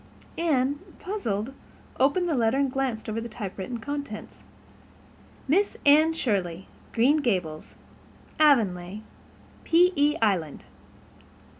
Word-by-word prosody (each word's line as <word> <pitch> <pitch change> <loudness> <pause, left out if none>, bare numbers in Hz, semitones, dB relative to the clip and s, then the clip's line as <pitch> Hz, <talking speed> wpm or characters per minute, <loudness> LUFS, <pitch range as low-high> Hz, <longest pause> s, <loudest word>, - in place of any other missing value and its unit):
Anne, 285 -4 +1 0.2
puzzled, 250 - -3 0.5
opened 290 +7 +3
the 330 - 0
letter 235 -1 +2
and 275 -2 +1
glanced 255 -4 -2
over 220 +1 -3
the 235 - -6
typewritten 205 +1 -6
contents. 280 -3 -6 1.0
Miss 385 +9 +2
Anne 310 +3 +6
Shirley, 190 - -2 0.2
Green 260 +7 +3
Gables, 180 - -2 0.6
Avonlea, 210 - +2 0.6
P.E. 330 -3 +3
Island. 185 -9 0
255 Hz, 100 wpm, -26 LUFS, 210-295 Hz, 1.0 s, Anne